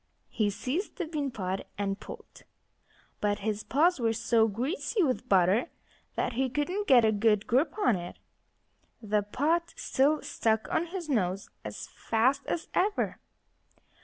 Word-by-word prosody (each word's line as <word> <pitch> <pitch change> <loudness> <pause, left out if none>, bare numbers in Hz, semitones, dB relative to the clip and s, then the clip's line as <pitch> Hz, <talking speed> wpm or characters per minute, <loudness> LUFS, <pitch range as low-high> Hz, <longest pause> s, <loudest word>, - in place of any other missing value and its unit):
He 215 -3 +1
seized 255 - -3
the 360 - -3
bean 300 -3 -2
pot 190 -5 -4
and 200 -1 -2
pulled. - - -11 0.8
But 205 0 0
his 215 -1 -1
paws 325 +4 +3
were 225 -2 +1
so 230 0 +3
greasy 290 - -1
with 255 -3 -1
butter 195 - +3 0.5
that - - -1
he 260 +2 0
couldn't 355 +10 -2
get 250 -6 +7
a 220 - +4
good 210 0 +2
grip 285 - +1
on 250 - +3
it. 175 -1 -7 0.8
The 210 -2 0
pot 320 +11 0
still 290 +3 +1
stuck 220 -1 0
on 340 - +1
his 350 -1 -5
nose 195 -8 -1
as - - -7
fast 255 +5 +1
as 335 +1 -2
ever. 405 +3 0
245 Hz, 150 wpm, -29 LUFS, 210-310 Hz, 0.8 s, get